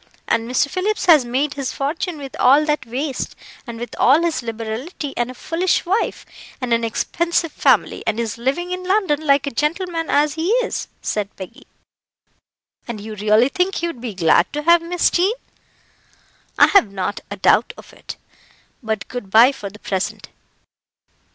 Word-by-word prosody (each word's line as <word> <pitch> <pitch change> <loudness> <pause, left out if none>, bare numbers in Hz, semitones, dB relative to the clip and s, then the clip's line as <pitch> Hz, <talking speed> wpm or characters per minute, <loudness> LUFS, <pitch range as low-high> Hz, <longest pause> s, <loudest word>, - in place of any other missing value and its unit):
And 230 0 0
Mr. 255 +3 +2
Phillips 390 +7 -2
has 310 -8 +6
made 270 +5 -1
his 275 -3 -3
fortune 315 +4 -3
with 275 -2 -8
all 280 +4 +5
that 300 -5 -1
waste, 265 +4 -4 0.3
and 230 -1 -7
with 240 - -7
all 290 +6 +5
his 335 -4 0
liberality, 230 - -5
and 240 0 -1
a 255 - -9
foolish 345 +8 0
wife, 390 +6 -1 0.3
and 250 -3 -1
an 230 0 +1
expensive 335 +8 -1
family, - - +2
and 220 +1 0
is 230 0 -3
living 280 +9 -1
in 365 0 -4
London 370 -6 +1
like 280 -2 +3
a 280 - -3
gentleman 330 +4 -2
as 290 +1 +2
he 325 +3 -2
is," - - -4 0.2
said 205 -2 -2
Peggy. 190 -2 -11 1.2
"And 235 -3 -5
you 215 +2 -7
really 215 +4 +3
think 365 +5 0
he 340 - -2
would 330 -9 -5
be 235 -5 -5
glad 165 -3 +3
to 295 0 -3
have 340 +1 +5
Miss 345 +1 +1
Jean?" 380 +6 +2 1.2
"I - - +8
have 310 - +4
not 195 +1 -3
a 205 - -6
doubt 210 +4 +3
of - - -14
it; - - -9 0.7
but 220 -3 -3
good 245 -6 -7
bye 230 +6 +7
for 210 -7 -7
the 205 - -14
present. 190 -2 -4
275 Hz, 175 wpm, -20 LUFS, 230-335 Hz, 1.2 s, I